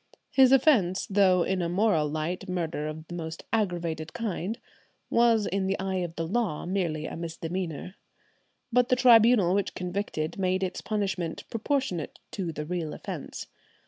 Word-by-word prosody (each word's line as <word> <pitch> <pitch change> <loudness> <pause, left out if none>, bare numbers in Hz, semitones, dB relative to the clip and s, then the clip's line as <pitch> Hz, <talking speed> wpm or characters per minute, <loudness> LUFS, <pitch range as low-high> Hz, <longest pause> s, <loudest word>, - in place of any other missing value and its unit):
"His 265 -2 +6
offence, 240 - +4
though 190 -3 +4
in 190 0 0
a 170 - -1
moral 175 -5 +2
light 170 +5 -3
murder 165 -4 -2
of 155 +1 -7
the - - -8
most 165 -1 -6
aggravated 170 -7 -1
kind, 220 -1 -3 0.5
was 230 -3 +4
in 195 0 -1
the 195 - 0
eye 190 0 -2
of 175 -2 -3
the 165 - -2
law 195 -3 -1
merely 170 -5 -1
a - - -5
misdemeanour." 170 +1 -4 0.8
But 250 0 +4
the 255 - +5
tribunal 230 -6 +6
which 200 -1 0
convicted 180 -3 -3
made 185 0 +1
its 185 -1 -3
punishment 195 -6 -2
proportionate 230 - -1
to 180 -4 -3
the 150 -1 -5
real 165 -2 -3
offence. - - -6
185 Hz, 155 wpm, -28 LUFS, 165-210 Hz, 0.8 s, His